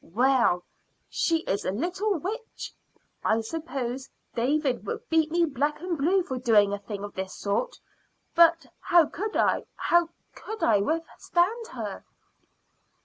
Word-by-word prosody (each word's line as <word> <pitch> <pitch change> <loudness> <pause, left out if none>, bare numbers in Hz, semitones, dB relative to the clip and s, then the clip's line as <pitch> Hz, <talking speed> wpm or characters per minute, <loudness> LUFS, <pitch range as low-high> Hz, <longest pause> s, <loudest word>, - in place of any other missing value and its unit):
Well, 235 -4 +2 0.5
she 330 -1 +1
is 200 - -1
a - - -1
little 365 - -1
witch. 430 - -6 0.5
I 220 - +3
suppose 265 -2 -4 0.2
Dave 280 +6 +1 0.2
would 465 +1 -5
beat 320 -1 +3
me 340 +1 +3
black 295 0 -1
and 355 0 -2
blue 350 +6 +2
for 260 -6 -4
doing 210 -5 +4
a 205 - -2
thing 200 0 -6
of 205 - -6
this 190 0 -5
sort. 205 - -1 0.6
But 335 -1 +5
how 345 -2 +5
could 410 +8 -4
I - - +2
how 345 -1 +2 0.2
could 440 0 -7
I 215 -3 +4
withstand 345 - 0
her?" - - -5
310 Hz, 145 wpm, -27 LUFS, 235-345 Hz, 0.6 s, But